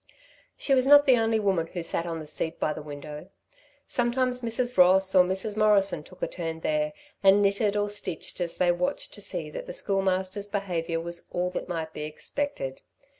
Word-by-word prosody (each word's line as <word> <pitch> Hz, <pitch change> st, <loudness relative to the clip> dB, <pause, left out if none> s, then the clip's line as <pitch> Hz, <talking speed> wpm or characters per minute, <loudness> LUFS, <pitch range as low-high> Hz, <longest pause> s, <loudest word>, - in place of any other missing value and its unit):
She 275 Hz, -, +1 dB
was 260 Hz, 0 st, +3 dB
not 290 Hz, 0 st, +8 dB
the 260 Hz, -3 st, +6 dB
only 225 Hz, -1 st, +2 dB
woman 190 Hz, -6 st, +1 dB
who 175 Hz, 0 st, -5 dB
sat 165 Hz, +1 st, 0 dB
on 165 Hz, -1 st, -3 dB
the 155 Hz, -, -7 dB
seat 160 Hz, +2 st, -3 dB
by 150 Hz, -, 0 dB
the 155 Hz, -, -7 dB
window. 150 Hz, +3 st, -9 dB, 0.6 s
Sometimes 250 Hz, +1 st, 0 dB
Mrs. 245 Hz, +1 st, -1 dB
Ross 190 Hz, +1 st, +5 dB
or 185 Hz, -1 st, +7 dB
Mrs. 190 Hz, +3 st, -2 dB
Morrison 205 Hz, -5 st, +3 dB
took 185 Hz, +4 st, -12 dB
a -, -, +1 dB
turn 165 Hz, -2 st, -5 dB
there 305 Hz, -, 0 dB, 0.3 s
and 195 Hz, +1 st, +6 dB
knitted 200 Hz, +1 st, +2 dB
or 205 Hz, 0 st, +1 dB
stitched 205 Hz, -3 st, -3 dB
as 170 Hz, -1 st, -1 dB
they 180 Hz, -1 st, +3 dB
watched 270 Hz, +11 st, -2 dB
to -, -, -6 dB
see -, -, -3 dB
that -, -, -7 dB
the -, -, -5 dB
Schoolmaster's 195 Hz, -, -1 dB
behaviour 175 Hz, -5 st, -2 dB
was 170 Hz, +1 st, -5 dB
all 180 Hz, +1 st, -1 dB
that 180 Hz, -, -5 dB
might 160 Hz, -2 st, -4 dB
be -, -, -6 dB
expected. 155 Hz, -, -4 dB
190 Hz, 195 wpm, -27 LUFS, 170-225 Hz, 0.6 s, not